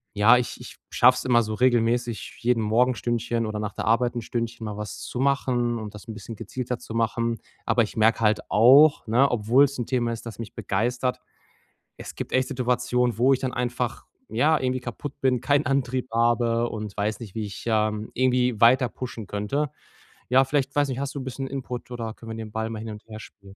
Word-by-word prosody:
ja, 110 Hz, +4 st, +6 dB
ich 125 Hz, -, -3 dB
ich -, -, -10 dB, 0.2 s
schaffe 125 Hz, +1 st, +6 dB
es -, -, -5 dB
immer 120 Hz, -2 st, +4 dB
so 110 Hz, -1 st, -3 dB
regelmäßig 120 Hz, -1 st, +1 dB
jeden 120 Hz, -1 st, +1 dB
Morgen 115 Hz, +4 st, +3 dB
1 -, -, -4 dB
Stündchen 120 Hz, -1 st, -1 dB
oder 110 Hz, 0 st, -4 dB
nach 105 Hz, -1 st, -4 dB
der -, -, -4 dB
Arbeit 120 Hz, +2 st, +2 dB
1 120 Hz, -, -2 dB
Stündchen 115 Hz, 0 st, -4 dB
mal 105 Hz, -1 st, -5 dB
was 105 Hz, -1 st, -6 dB
zu 125 Hz, -, -6 dB
machen 125 Hz, -3 st, +1 dB
und 105 Hz, -1 st, -7 dB
das 105 Hz, -, -12 dB
'n 110 Hz, -, -6 dB
bisschen 110 Hz, +2 st, -8 dB
gezielter 120 Hz, +3 st, -4 dB
zu 115 Hz, -, -10 dB
machen. 115 Hz, 0 st, 0 dB, 0.3 s
Aber 120 Hz, -, +3 dB
ich 110 Hz, -, -3 dB
merke 110 Hz, +2 st, +4 dB
halt 110 Hz, -1 st, +2 dB
auch, 135 Hz, +5 st, +6 dB
ne, 125 Hz, +5 st, +4 dB
obwohl 120 Hz, +4 st, +4 dB
es 140 Hz, -1 st, +1 dB
'n 120 Hz, -, -3 dB
Thema 120 Hz, -2 st, 0 dB
ist, 115 Hz, 0 st, -6 dB
das 110 Hz, -3 st, -8 dB
mich 115 Hz, -2 st, -7 dB
begeistert, 120 Hz, +5 st, -1 dB, 0.8 s
es -, -, -9 dB
gibt -, -, -6 dB
echt 130 Hz, 0 st, +2 dB
Situationen, 125 Hz, -1 st, 0 dB
wo 130 Hz, +3 st, +5 dB
ich 130 Hz, -, +3 dB
dann 130 Hz, -1 st, -3 dB
einfach, 120 Hz, 0 st, -3 dB, 0.2 s
ja, 150 Hz, +8 st, +2 dB
irgendwie 130 Hz, 0 st, -1 dB
kaputt 125 Hz, +3 st, -6 dB
bin, 130 Hz, -2 st, +2 dB
keinen 145 Hz, +4 st, +1 dB
Antrieb 130 Hz, -2 st, 0 dB
habe 115 Hz, 0 st, +2 dB
und 105 Hz, -2 st, -6 dB
weiß 105 Hz, +1 st, -1 dB
nicht, 110 Hz, -5 st, -10 dB
wie 110 Hz, -1 st, -2 dB
ich, 100 Hz, -1 st, -8 dB
ähm, 110 Hz, -1 st, 0 dB
irgendwie 125 Hz, -2 st, +2 dB
weiter 125 Hz, +2 st, +5 dB
pushen 120 Hz, -5 st, -7 dB
könnte. 105 Hz, +9 st, -2 dB, 0.6 s
Ja, 130 Hz, +2 st, +5 dB
vielleicht, 135 Hz, 0 st, -1 dB
weiß 145 Hz, -1 st, +2 dB
nicht, 130 Hz, -1 st, -4 dB
hast 140 Hz, 0 st, -3 dB
du 140 Hz, -, -5 dB
'n 130 Hz, -, -6 dB
bisschen 135 Hz, +1 st, -4 dB
Input 125 Hz, -2 st, -6 dB
oder 115 Hz, -2 st, -4 dB
können 115 Hz, 0 st, -10 dB
wir 110 Hz, -, -5 dB
den 110 Hz, -1 st, -7 dB
Ball 110 Hz, 0 st, -2 dB
mal 110 Hz, -1 st, -5 dB
hin 110 Hz, +1 st, -6 dB
und 105 Hz, 0 st, -10 dB
her 110 Hz, -1 st, -9 dB
spielen? 100 Hz, -1 st, -14 dB
120 Hz, 220 wpm, -25 LUFS, 110-125 Hz, 0.8 s, ja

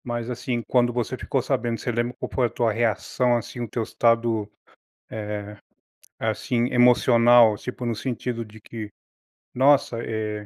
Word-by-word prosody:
Mas 120 Hz, -1 st, -4 dB
assim, 125 Hz, -1 st, -3 dB
quando 120 Hz, -1 st, +3 dB
você 120 Hz, +1 st, -2 dB
ficou 135 Hz, +1 st, -2 dB
sabendo, 120 Hz, -4 st, -1 dB
você 120 Hz, -, -2 dB
lembra 120 Hz, +1 st, -2 dB
qual -, -, -4 dB
foi 125 Hz, -2 st, +2 dB
a -, -, -9 dB
tua 115 Hz, -1 st, 0 dB
reação, 120 Hz, +2 st, +1 dB
assim, 120 Hz, +1 st, -7 dB
o 120 Hz, -, -3 dB
teu 115 Hz, -, -2 dB
estado, 115 Hz, -2 st, +1 dB, 0.6 s
eh, 105 Hz, -1 st, -5 dB, 0.6 s
assim, 120 Hz, -1 st, -1 dB
emocional, 120 Hz, -2 st, +5 dB
tipo 125 Hz, +3 st, -6 dB
no 120 Hz, -, 0 dB
sentido 120 Hz, 0 st, -4 dB
de 110 Hz, 0 st, -15 dB
que, 110 Hz, -1 st, -8 dB, 0.6 s
“Nossa, 140 Hz, -1 st, +3 dB
eh, 105 Hz, -2 st, -4 dB
120 Hz, 155 wpm, -24 LUFS, 110-125 Hz, 0.6 s, emocional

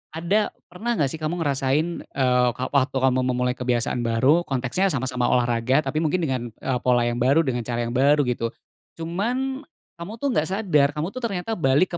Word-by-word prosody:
ada 190 Hz, +6 st, +1 dB, 0.2 s
pernah 230 Hz, +6 st, -2 dB
gak 140 Hz, -7 st, +1 dB
sih 160 Hz, -, -6 dB
kamu 165 Hz, +2 st, -2 dB
ngerasain, 145 Hz, +3 st, 0 dB
eee, 125 Hz, -2 st, +2 dB
ka 130 Hz, -, -3 dB
waktu 140 Hz, -1 st, +1 dB
kamu 130 Hz, -1 st, +3 dB
memulai 125 Hz, 0 st, 0 dB
kebiasaan 120 Hz, -1 st, 0 dB
baru 130 Hz, +9 st, +3 dB
konteksnya 135 Hz, +9 st, 0 dB
sama-sama 125 Hz, -1 st, -1 dB
olahraga 120 Hz, +3 st, +2 dB
tapi 150 Hz, +3 st, -2 dB
mungkin 170 Hz, +3 st, 0 dB
dengan, 130 Hz, -6 st, -1 dB
eee, 125 Hz, +1 st, -2 dB
pola 125 Hz, -1 st, +4 dB
yang 120 Hz, 0 st, -1 dB
baru, 140 Hz, +6 st, +4 dB
dengan 120 Hz, -3 st, -2 dB
cara 120 Hz, -1 st, -2 dB
yang 120 Hz, -, -4 dB
baru 145 Hz, +3 st, +4 dB
gitu. 115 Hz, 0 st, -2 dB, 0.4 s
Cuman 250 Hz, -, -2 dB, 0.3 s
kamu 170 Hz, +5 st, -7 dB
tuh 285 Hz, -, +1 dB
gak 155 Hz, -, +1 dB
sadar, 170 Hz, -9 st, +3 dB
kamu 155 Hz, +2 st, -2 dB
tuh 255 Hz, -, -6 dB
ternyata 200 Hz, 0 st, -3 dB
balik 155 Hz, +4 st, +2 dB
140 Hz, 185 wpm, -23 LUFS, 125-170 Hz, 0.4 s, pola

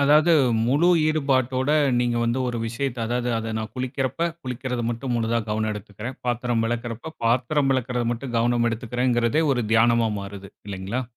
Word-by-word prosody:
அதாவது, 150 Hz, +4 st, +5 dB, 0.3 s
முழு 145 Hz, +8 st, +3 dB, 0.2 s
ஈடுபாட்டோட 135 Hz, -3 st, +1 dB, 0.3 s
நீங்க 120 Hz, -1 st, +1 dB
வந்து 120 Hz, +2 st, 0 dB
ஒரு 120 Hz, -, -3 dB
விஷயத்த 120 Hz, +2 st, -3 dB
அதாது, 120 Hz, +1 st, -1 dB
அது 115 Hz, 0 st, -4 dB
நான் 110 Hz, 0 st, -5 dB
குளிக்கரப்ப 130 Hz, +5 st, -1 dB
குளிக்கறது 125 Hz, -1 st, -3 dB
மட்டும் 120 Hz, +2 st, -3 dB
முழுதா 115 Hz, 0 st, +1 dB
கவனம் 110 Hz, 0 st, 0 dB
எடுத்துக்குறேன் 105 Hz, +4 st, -7 dB
பாத்தரம் 120 Hz, -1 st, 0 dB
வெளக்கறப்ப, 120 Hz, +6 st, -4 dB
பாத்தரம் 130 Hz, +4 st, +2 dB
வெளக்கறது, 125 Hz, -2 st, -1 dB
மட்டும் 120 Hz, +1 st, -6 dB
கவனம் 120 Hz, 0 st, +2 dB
எடுத்துக்குறேன்றதே 120 Hz, +3 st, 0 dB
ஒரு 125 Hz, -2 st, 0 dB
தியானமா 115 Hz, 0 st, +4 dB
மாறுது, 100 Hz, -1 st, -9 dB, 0.2 s
இல்லைங்களா? 100 Hz, +6 st, -3 dB
120 Hz, 145 wpm, -24 LUFS, 115-130 Hz, 0.3 s, அதாவது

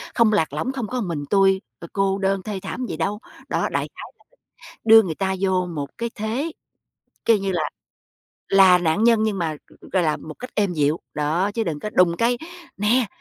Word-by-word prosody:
không 225 Hz, -2 st, +4 dB
lạc 160 Hz, -8 st, +1 dB
lõng, 200 Hz, -, -2 dB
không 250 Hz, -5 st, -4 dB
có 250 Hz, +1 st, -3 dB
một 195 Hz, -, -3 dB
mình, 150 Hz, -4 st, -3 dB
tui, 195 Hz, -1 st, +4 dB, 0.2 s
ờ, 170 Hz, -, -9 dB
cô 195 Hz, -1 st, +1 dB
đơn 195 Hz, -1 st, 0 dB
thê 205 Hz, -3 st, -4 dB
thảm 240 Hz, +6 st, -4 dB
gì 160 Hz, -, -5 dB
đâu. 200 Hz, +5 st, -1 dB, 0.3 s
Đó, -, -, 0 dB
đại -, -, -1 dB
khái -, -, -9 dB
là -, -, -29 dB, 0.6 s
đưa 225 Hz, 0 st, +9 dB
người 165 Hz, -4 st, -3 dB
ta 190 Hz, -1 st, -1 dB
vô 185 Hz, -2 st, +1 dB
một 145 Hz, -5 st, -5 dB
cái 235 Hz, 0 st, -2 dB
thế, 235 Hz, +10 st, -2 dB, 0.7 s
kêu 230 Hz, -, +5 dB
như 195 Hz, -1 st, -2 dB
là 170 Hz, -3 st, 0 dB, 0.9 s
là 190 Hz, -2 st, +7 dB
nạn 175 Hz, +6 st, +1 dB
nhân, 230 Hz, -2 st, +5 dB
nhưng 205 Hz, -3 st, -1 dB
mà 160 Hz, -3 st, -2 dB
g -, -, -18 dB
gọi 185 Hz, -2 st, +3 dB
là 155 Hz, -2 st, +1 dB
một 155 Hz, -1 st, -9 dB
cách 250 Hz, -, -7 dB
êm 200 Hz, -4 st, +1 dB
dịu, 150 Hz, +1 st, +1 dB
đó, 160 Hz, +7 st, 0 dB
chứ 225 Hz, -, 0 dB
đừng 155 Hz, -5 st, -3 dB
có 210 Hz, -, -4 dB
đùng 175 Hz, -3 st, +3 dB
cái, 240 Hz, +1 st, +1 dB, 0.4 s
nè, 225 Hz, +4 st, +3 dB
195 Hz, 220 wpm, -22 LUFS, 170-220 Hz, 0.9 s, đưa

